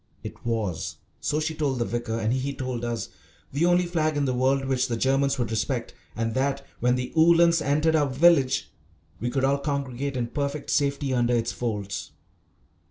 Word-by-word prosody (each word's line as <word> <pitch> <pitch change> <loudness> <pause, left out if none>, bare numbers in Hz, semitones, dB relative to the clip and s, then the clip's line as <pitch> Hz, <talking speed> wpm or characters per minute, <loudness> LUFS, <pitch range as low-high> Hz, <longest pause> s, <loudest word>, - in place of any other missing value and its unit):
It - - -9
was, 110 -7 -2 0.2
so 150 - 0
she 160 +1 -1
told 145 -4 -1
the 120 - 0
vicar, 120 -1 -2
and 110 +1 0
he 135 +2 -2
told 130 -2 -4
us, 120 -1 -3 0.4
the 155 +5 +2
only 175 0 +4
flag 155 -3 0
in 145 - +1
the 130 - 0
world 135 +2 +2
which 130 -1 +1
the 120 -2 -2
Germans 135 +2 +2
would 120 -4 -2
respect, 110 - -2 0.2
and 115 0 -1
that 140 +2 -1
when 125 +1 +3
the 125 0 -4
Uhlans 170 0 +5
entered 150 +3 +2
our 145 -3 +2
village 135 -1 +3 0.5
we 120 - -1
could 135 +1 -1
all 140 +1 +2
congregate 140 -1 -2
in 120 - 0
perfect 140 +3 -3
safety 140 -2 +1
under 120 -1 +2
its 115 -1 0
folds. 105 -5 -4
135 Hz, 185 wpm, -26 LUFS, 120-145 Hz, 0.5 s, Uhlans